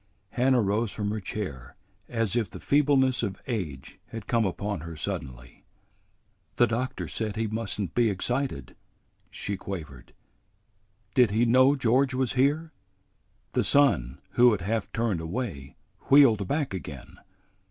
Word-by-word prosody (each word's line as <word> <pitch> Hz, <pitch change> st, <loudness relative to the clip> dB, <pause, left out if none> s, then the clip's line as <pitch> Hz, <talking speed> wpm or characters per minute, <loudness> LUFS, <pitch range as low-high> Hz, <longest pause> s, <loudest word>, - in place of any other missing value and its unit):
Hannah 130 Hz, -1 st, +3 dB
rose 105 Hz, +2 st, 0 dB
from 105 Hz, -1 st, -2 dB
her 110 Hz, -, -2 dB
chair 90 Hz, -, -6 dB, 0.3 s
as 115 Hz, -3 st, -1 dB
if 115 Hz, -6 st, 0 dB
the -, -, -9 dB
feebleness 135 Hz, -3 st, +3 dB
of 100 Hz, -4 st, -3 dB
age 85 Hz, -, -5 dB
had 115 Hz, -3 st, -8 dB
come 115 Hz, -2 st, +1 dB
upon 100 Hz, +1 st, -3 dB
her 80 Hz, +1 st, -8 dB
suddenly. 60 Hz, -4 st, -6 dB, 0.9 s
"The 120 Hz, -, +5 dB
doctor 125 Hz, +3 st, -3 dB
said 110 Hz, -2 st, -3 dB
he 115 Hz, -, -1 dB
must 110 Hz, -1 st, -3 dB
n't 95 Hz, -5 st, -3 dB
be 120 Hz, -2 st, +3 dB
excited," 115 Hz, -, -2 dB, 0.5 s
she 100 Hz, -1 st, -4 dB
quavered. 75 Hz, -10 st, -8 dB, 1.0 s
"Did 125 Hz, -4 st, +5 dB
he 110 Hz, +4 st, +2 dB
know 130 Hz, +4 st, +5 dB
George 130 Hz, +1 st, +2 dB
was 130 Hz, -1 st, 0 dB
here?" 145 Hz, +5 st, +1 dB, 0.8 s
The -, -, +1 dB
son, 70 Hz, -, +3 dB
who 120 Hz, -1 st, +5 dB
had 100 Hz, -, -2 dB
half 110 Hz, +3 st, -2 dB
turned 110 Hz, -7 st, -1 dB
away, 80 Hz, -, -5 dB, 0.3 s
wheeled 120 Hz, -9 st, +6 dB
back 145 Hz, -3 st, -1 dB
again. 75 Hz, -7 st, -8 dB
110 Hz, 140 wpm, -27 LUFS, 95-125 Hz, 1.0 s, wheeled